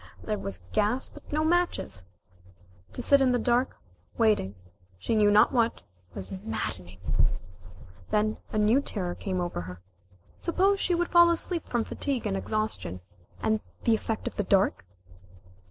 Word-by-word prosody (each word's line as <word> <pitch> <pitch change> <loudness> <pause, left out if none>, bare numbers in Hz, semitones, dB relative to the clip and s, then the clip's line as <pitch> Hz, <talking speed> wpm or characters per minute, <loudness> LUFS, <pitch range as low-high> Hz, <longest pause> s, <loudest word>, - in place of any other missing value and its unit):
There 210 -2 -2
was 95 -3 -5
gas, 215 +5 +1
but 295 - -14
no 305 +1 +1
matches. 330 - 0 0.9
To 250 - -3
sit 280 +2 +5
in 255 -2 +4
the - - +3
dark, 245 +2 +1 0.4
waiting, 210 - +2 0.4
she 95 - -2
knew 210 -2 +5
not 205 +1 +6
what, 235 -3 +1 0.3
was 95 - -7
maddening. 190 - -5 1.1
Then 215 +1 +1
a - - -2
new 215 +6 +4
terror 185 -9 -3
came 185 -1 -3
over 175 - -2
her. 90 0 -8 0.6
Suppose 385 +3 +2
she 360 - +2
should 350 0 0
fall 345 0 +7
asleep 340 0 0
from 240 -2 0
fatigue 265 -2 -2
and 200 -2 0
exhaustion, 215 - -2 0.4
and 220 -1 +1 0.2
the 230 - +4
effect 220 0 -2
of - - -5
the 205 - +1
dark? 190 - +2
220 Hz, 155 wpm, -28 LUFS, 195-270 Hz, 1.1 s, fall